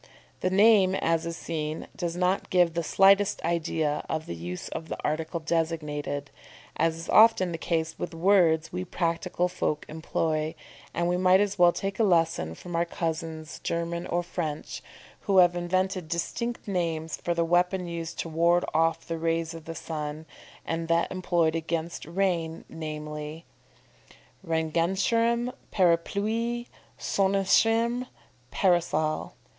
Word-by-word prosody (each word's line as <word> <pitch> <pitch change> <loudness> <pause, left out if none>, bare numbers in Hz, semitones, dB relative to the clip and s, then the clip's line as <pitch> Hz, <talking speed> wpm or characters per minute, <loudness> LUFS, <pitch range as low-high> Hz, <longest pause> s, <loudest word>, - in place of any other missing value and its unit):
The 185 - 0
name, 195 -1 +5
as 165 -2 0
is 165 0 -4
seen, 155 -1 -4
does 170 -2 -3
not 180 +2 0
give 175 -2 +3
the 170 - 0
slightest 195 +4 +4
idea 160 -3 0
of 160 0 -2
the - - -5
use 85 +2 -6
of 160 0 -6
the - - -3
article 160 +2 -2
designated, 150 -3 -2 0.4
as 165 0 +1
is 165 - -8
often 220 -5 +6
the 165 - -4
case 165 -1 -2
with 170 - -4
words 165 -3 +3
we 180 0 -2
practical 175 0 -1
folk 155 -4 -2
employ; 160 0 -2 0.4
and 170 0 -1
we 180 0 +1
might 190 +2 +4
well 175 0 +7
take 195 +3 -4
a - - +4
lesson 165 - +2
from 175 - -7
our 170 - +3
cousins 160 -2 -4
German 170 +1 -2
or 175 +1 0
French, 160 -4 -4 0.5
who 195 -2 +3
have 175 -1 +6
invented 185 0 -1
distinct 235 +9 -3
names 165 -4 -2
for 170 - -2
the 170 0 +1
weapon 180 +2 +2
used 170 -1 -5
to - - -5
ward 170 +2 +2
off 165 +1 +1
the 165 -1 -3
rays 165 0 -1
of 165 -1 -10
the 165 - -6
sun, 155 -1 -5 0.4
and 165 0 -2
that 170 0 +1
employed 175 -3 +1
against 165 0 -3
rain, 170 -2 -1
namely, 150 0 -6 1.0
Regenschirm, 195 +9 +1 0.2
parapluie; 215 +7 +1 0.3
Sonnenschirm, 225 +5 +2 0.4
_parasol. 165 -4 +1
170 Hz, 140 wpm, -27 LUFS, 160-185 Hz, 1.0 s, well